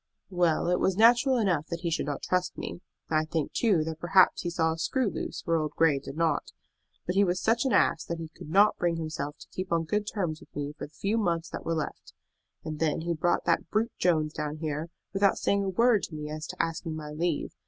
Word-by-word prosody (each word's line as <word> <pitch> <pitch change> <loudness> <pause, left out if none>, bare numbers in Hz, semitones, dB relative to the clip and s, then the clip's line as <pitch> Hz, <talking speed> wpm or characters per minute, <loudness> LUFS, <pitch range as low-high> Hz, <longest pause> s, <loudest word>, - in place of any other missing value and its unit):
"Well, 175 -3 +2
it 180 0 +2
was 190 -1 +1
natural 240 +4 +5
enough 180 -9 +1
that 170 -1 -5
he 170 - -1
should 160 - -1
not 145 - -3
trust 180 0 0
me. - - -6 0.3
I 155 0 +3
think, 155 -1 -2
too, 200 -9 +3
that 160 0 -5
perhaps 185 +2 +4
he 175 - -2
saw 160 -1 +1
a - - -7
screw 255 +8 0
loose - - -4
where 165 -1 +2
old 155 -1 -3
Grey 160 -4 +3
did 140 +1 -9
not; 165 -1 0 0.5
but 180 - -1
he 200 +2 +4
was 180 -1 +1
such 230 +3 +2
an 265 - +1
ass 200 - +3
that 170 - -3
he 165 -1 -6
could - - -10
not 200 +5 +4
bring 175 -1 +1
himself 155 -2 -4
to - - -14
keep 185 -1 -5
on 165 -1 +2
good 210 +6 -1
terms 170 -7 -2
with - - -18
me 145 0 -3
for - - -6
the 150 - -29
few 210 +7 0
months 170 -5 0
that - - -7
were 165 - 0
left. 155 - -5 0.5
And 155 -1 -5
then 160 -1 +1
he 170 +1 -1
brought 170 +2 0
that - - +1
brute 220 +2 0
Jones 155 -4 +2
down 150 0 -4
here, 155 +1 -3 0.2
without 195 0 +3
saying 200 0 +1
a - - 0
word 230 +2 +3
to 160 - -10
me 150 0 -5
as 155 +1 -5
to - - -8
asking 165 -1 -2
my 150 -1 -6
leave. 160 0 -1
170 Hz, 245 wpm, -28 LUFS, 155-195 Hz, 0.5 s, natural